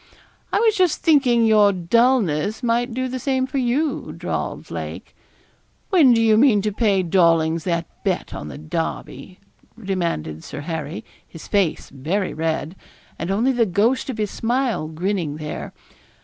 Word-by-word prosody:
'I -, -, +2 dB
was 445 Hz, -2 st, +3 dB
just 365 Hz, -4 st, +1 dB
thinking 260 Hz, -7 st, +4 dB
your 210 Hz, -2 st, +5 dB
dulness 205 Hz, -, +1 dB
might 240 Hz, +1 st, +1 dB
do 255 Hz, +2 st, -2 dB
the 255 Hz, 0 st, -4 dB
same 260 Hz, 0 st, 0 dB
for 265 Hz, +1 st, -3 dB
you,' 265 Hz, +5 st, -1 dB
drawled -, -, -4 dB
Lake. -, -, -7 dB, 0.8 s
'When 320 Hz, -10 st, +6 dB
do 230 Hz, -, +4 dB
you 220 Hz, -1 st, +4 dB
mean 220 Hz, -5 st, +4 dB
to 210 Hz, -, 0 dB
pay 200 Hz, -3 st, +1 dB
Dawlings 165 Hz, -2 st, +2 dB
that 170 Hz, -2 st, -1 dB, 0.2 s
bet -, -, -2 dB
on 75 Hz, -, -6 dB
the 70 Hz, -, -8 dB
Derby?' 165 Hz, -, -5 dB, 0.4 s
demanded 170 Hz, -, -3 dB
Sir 145 Hz, -, -7 dB
Harry, 160 Hz, 0 st, -5 dB, 0.2 s
his 165 Hz, -, -11 dB
face 195 Hz, -6 st, 0 dB
very 165 Hz, +9 st, -2 dB
red, 160 Hz, +1 st, -2 dB, 0.4 s
and 165 Hz, -, -3 dB
only 225 Hz, +7 st, +2 dB
the 240 Hz, -3 st, +2 dB
ghost 220 Hz, +9 st, +1 dB
of 250 Hz, -, -4 dB
his 210 Hz, -2 st, -2 dB
smile 240 Hz, -7 st, -1 dB
grinning 165 Hz, -1 st, -2 dB
there. 150 Hz, -1 st, -6 dB
205 Hz, 155 wpm, -21 LUFS, 165-245 Hz, 0.8 s, When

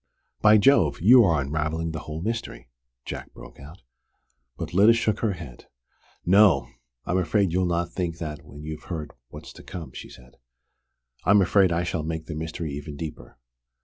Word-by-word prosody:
"By 110 Hz, 0 st, +7 dB
Jove, 100 Hz, -, +4 dB
you 120 Hz, +7 st, +7 dB
are 85 Hz, -5 st, +2 dB
unravelling 80 Hz, +3 st, -2 dB
the 80 Hz, -, -5 dB
whole 80 Hz, +2 st, -7 dB
mystery!" 115 Hz, -, -5 dB, 0.3 s
Jack -, -, -7 dB
broke -, -, -13 dB
out. 75 Hz, +4 st, -13 dB, 0.7 s
But -, -, -6 dB
Lyda 105 Hz, +5 st, +6 dB
shook 115 Hz, -2 st, 0 dB
her 110 Hz, -4 st, 0 dB
head. 80 Hz, -8 st, -11 dB, 0.6 s
"No! 90 Hz, -, +5 dB, 0.4 s
I'm 90 Hz, -, 0 dB
afraid 95 Hz, +1 st, +1 dB
you'll 90 Hz, +1 st, +1 dB
not 85 Hz, 0 st, -1 dB
think 85 Hz, -3 st, -3 dB
that 75 Hz, -3 st, -6 dB
when 75 Hz, +1 st, -12 dB
you've 75 Hz, 0 st, -7 dB
heard 75 Hz, -5 st, -5 dB, 0.2 s
what's -, -, -11 dB
to -, -, -13 dB
come," 85 Hz, -4 st, -8 dB
she -, -, -9 dB
said. 60 Hz, -1 st, -17 dB, 0.9 s
"I'm 100 Hz, +4 st, +5 dB
afraid 95 Hz, -1 st, +3 dB
I 85 Hz, +1 st, 0 dB
shall 85 Hz, -2 st, -2 dB
make 80 Hz, +1 st, -4 dB
the 80 Hz, -, -6 dB
mystery 80 Hz, 0 st, -5 dB
even 70 Hz, +1 st, -7 dB
deeper. 80 Hz, -4 st, -8 dB
85 Hz, 175 wpm, -25 LUFS, 75-95 Hz, 0.9 s, By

